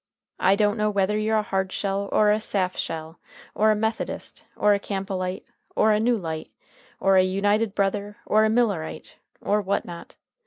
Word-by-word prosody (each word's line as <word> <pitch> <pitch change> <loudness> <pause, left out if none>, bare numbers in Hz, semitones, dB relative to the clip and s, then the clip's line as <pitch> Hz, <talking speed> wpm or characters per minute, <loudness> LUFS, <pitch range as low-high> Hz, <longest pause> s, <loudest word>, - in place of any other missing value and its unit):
I 190 +2 +4
don't 205 +1 +1
know 210 0 +1
whether 200 0 +1
you're 215 +1 +1
a 215 - +1
Hardshell 195 0 -2
or 210 -1 +4
a 210 - +2
Saftshell, 180 -5 -2 0.4
or 215 +1 +3
a 215 - +4
Methodist, 220 +1 -3
or 210 0 +4
a 200 - +1
Campbellite, 190 -1 -4 0.3
or 220 - +4
a 210 - +3
New 235 +2 +2
Light, 160 -4 -5 0.5
or 195 -1 +4
a 185 - +6
United 205 +3 +1
Brother, 200 +2 -1
or 215 +1 +3
a 220 - +3
Millerite, 215 -8 -1 0.2
or 210 +1 +1
what 200 0 -1
not. 170 -1 -10
200 Hz, 170 wpm, -24 LUFS, 190-215 Hz, 0.5 s, a